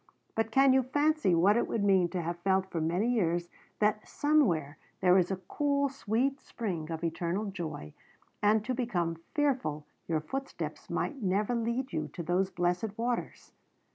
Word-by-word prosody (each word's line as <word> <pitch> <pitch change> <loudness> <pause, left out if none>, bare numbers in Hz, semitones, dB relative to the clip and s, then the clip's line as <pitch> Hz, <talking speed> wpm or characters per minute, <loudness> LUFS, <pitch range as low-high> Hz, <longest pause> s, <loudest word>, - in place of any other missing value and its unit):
But 225 0 0
can 270 +3 +5
you 265 - +5
fancy 290 - +2
what 190 +5 +5
it - - +1
would 220 - -1
mean 190 -3 +4
to 175 0 -3
have 170 +1 -3
felt 190 +1 +1
for 165 - -2
many 175 +8 +1
years 175 -7 +1 0.3
that 210 0 +1
somewhere 175 - +2 0.2
there 180 -1 +5
was 180 -2 +4
a 195 - 0
cool, 280 -1 +1
sweet 265 +2 -1
spring 175 -9 -4
of 165 0 -4
eternal 170 +5 -1
joy, 160 - -6 0.5
and 210 +1 +3
to 255 - -1
become 175 -10 -1
fearful 255 - 0 0.2
your 160 -2 0
footsteps 270 - -5
might 280 -4 -2
never 200 +4 +1
lead 235 +3 -1
you 155 -1 -1
to 170 - -5
those 180 +3 +1
blessed 180 +3 -1
waters? 240 +1 -3
200 Hz, 170 wpm, -30 LUFS, 170-245 Hz, 0.5 s, can